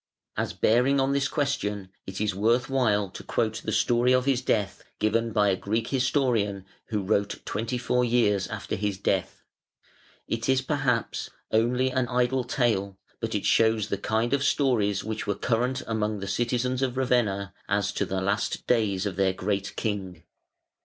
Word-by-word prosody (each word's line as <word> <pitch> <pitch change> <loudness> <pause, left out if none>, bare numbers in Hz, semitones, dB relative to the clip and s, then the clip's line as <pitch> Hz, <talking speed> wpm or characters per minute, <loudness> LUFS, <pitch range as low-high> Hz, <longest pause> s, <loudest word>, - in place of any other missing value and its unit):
As - - -2
bearing 125 +5 +3
on 135 +1 +2
this 140 0 +1
question 105 - -2 0.2
it 95 0 -5
is 105 0 0
worth 115 +6 +1
while 105 -7 +2
to - - -9
quote 110 0 -1
the - - -2
story 120 +1 +3
of 130 0 +3
his 135 -3 +2
death 105 -6 -1
given 115 +2 +1
by 105 -2 +3
a 95 - +2
Greek 110 +5 -2
historian 125 -7 +1 0.2
who 105 -3 -2
wrote 100 +1 0
twenty 115 +4 -2
four 125 +1 +1
years 115 -5 +2
after - - -4
his 100 -1 -2
death. 95 -1 -1 0.8
It 115 +2 -2
is, 130 0 +3
perhaps, 135 -3 -1 0.2
only 125 +4 +2
an 130 -1 0
idle 125 +1 +1
tale, 110 -7 0 0.2
but - - -3
it - - -1
shows 110 -2 +3
the 100 - -1
kind 110 +4 0
of 140 -1 +2
stories 110 -9 +2
which 110 0 -4
were 100 - 0
current 125 +4 0
among 110 -2 -1
the 100 - -5
citizens 125 +4 0
of 130 -1 -1
Ravenna 105 -7 +1 0.2
as 100 -1 +1
to 105 - -1
the 95 -1 -2
last 100 +3 -1
days 105 -5 +1
of 95 -3 -3
their 95 -1 +2
great 100 +1 -2
king. 95 -6 -3
110 Hz, 175 wpm, -26 LUFS, 100-125 Hz, 0.8 s, bearing